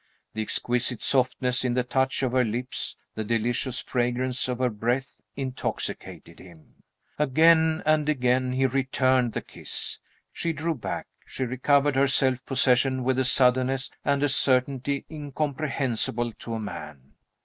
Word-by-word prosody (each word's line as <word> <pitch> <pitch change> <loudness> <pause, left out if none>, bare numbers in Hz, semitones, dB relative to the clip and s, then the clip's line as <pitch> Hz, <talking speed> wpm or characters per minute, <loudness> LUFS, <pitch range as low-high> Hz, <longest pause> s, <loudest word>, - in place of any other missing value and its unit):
The 110 - -3
exquisite 120 +2 0
softness 130 -1 +1
in 125 -1 0
the 125 - +1
touch 130 +2 0
of 130 - 0
her 130 0 +3
lips, 125 +3 -3 0.2
the 110 - -4
delicious 120 +3 -1
fragrance 125 +1 -1
of 125 -1 -2
her 125 -1 0
breath, 120 +5 -2
intoxicated 130 -1 -4
him. 85 -4 -17 0.4
Again 160 +3 +4
and 155 -1 +2
again 130 -2 +1
he 135 +1 +1
returned 130 -2 +1
the - - -3
kiss. - - -2 0.3
She 165 -1 -2
drew 160 +2 -2
back; 125 - -5 0.2
she - - -4
recovered 140 +3 +2
her 135 +1 +4
self 130 -2 +2
possession 130 0 +2
with 130 +1 +1
a 130 - +2
suddenness 130 +1 +3
and 140 0 +1
a 145 - +2
certainty 135 +1 +1
incomprehensible 140 -6 -2
to 115 +1 -6
a - - -3
man. 75 -9 -8
130 Hz, 145 wpm, -26 LUFS, 120-135 Hz, 0.4 s, Again